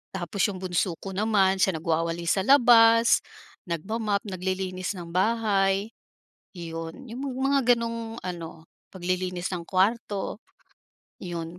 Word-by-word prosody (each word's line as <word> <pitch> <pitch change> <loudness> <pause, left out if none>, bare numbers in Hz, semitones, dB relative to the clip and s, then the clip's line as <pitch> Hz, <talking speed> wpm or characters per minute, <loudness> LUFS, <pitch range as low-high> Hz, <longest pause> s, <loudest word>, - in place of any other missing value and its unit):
Tapos 180 +1 -5
'yong 190 -2 -6
bunso 175 -1 0
ko 195 - -5
naman 195 -1 +2
siya 190 -2 +2
nagwawalis 165 +3 0
sa - - 0
labas, 230 -4 +6 0.5
nagma-mop, 200 +5 -2
naglilinis 185 0 -3
ng 175 -2 -8
bahay, 200 0 +1 0.6
'yon. 165 +6 -7
'Yong 245 +4 -6 0.2
mga 270 -2 +4
gano'ng 230 -1 -5
ano, 165 -3 -7 0.3
paglilinis 180 -1 -2
ng 170 - -5
kwarto, 205 +1 0 0.8
'yon. 170 -1 -6
190 Hz, 115 wpm, -26 LUFS, 175-225 Hz, 0.8 s, labas